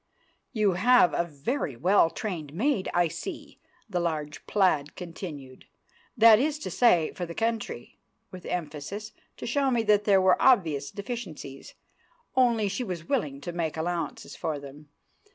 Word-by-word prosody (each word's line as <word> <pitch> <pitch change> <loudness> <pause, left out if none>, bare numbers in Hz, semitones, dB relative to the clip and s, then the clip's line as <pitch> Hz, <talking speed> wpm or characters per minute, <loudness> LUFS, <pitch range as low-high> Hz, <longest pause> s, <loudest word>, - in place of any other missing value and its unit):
"You 215 -4 +2
have 200 +2 +4
a - - +1
very 150 - -3
well 180 +5 +4
trained 165 -7 -5
maid, 240 0 0
I 175 -1 +3
see," - - -8 0.3
the 185 -5 -2
large 155 -4 -3
plaid 165 -8 +1
continued, 160 -7 -8 0.5
"that 225 -1 +8
is 295 +3 0
to - - -5
say, 180 -10 +3
for 175 - -5
the 170 - -8
country"—with 210 - -5
emphasis, 175 +6 -5 0.3
to - - -7
show 275 +3 +1
me 240 -3 +1
that 210 -1 +3
there 195 -2 +5
were 185 0 +3
obvious 160 - +3
deficiencies, 200 - -7 0.6
only 235 -5 +3
she 200 +6 -2
was 175 -6 -6
willing 150 - -1
to 175 - -5
make 165 -2 -3
allowances 170 +1 -3
for 155 -2 -3
them. 145 +1 -12
180 Hz, 150 wpm, -27 LUFS, 155-220 Hz, 0.6 s, that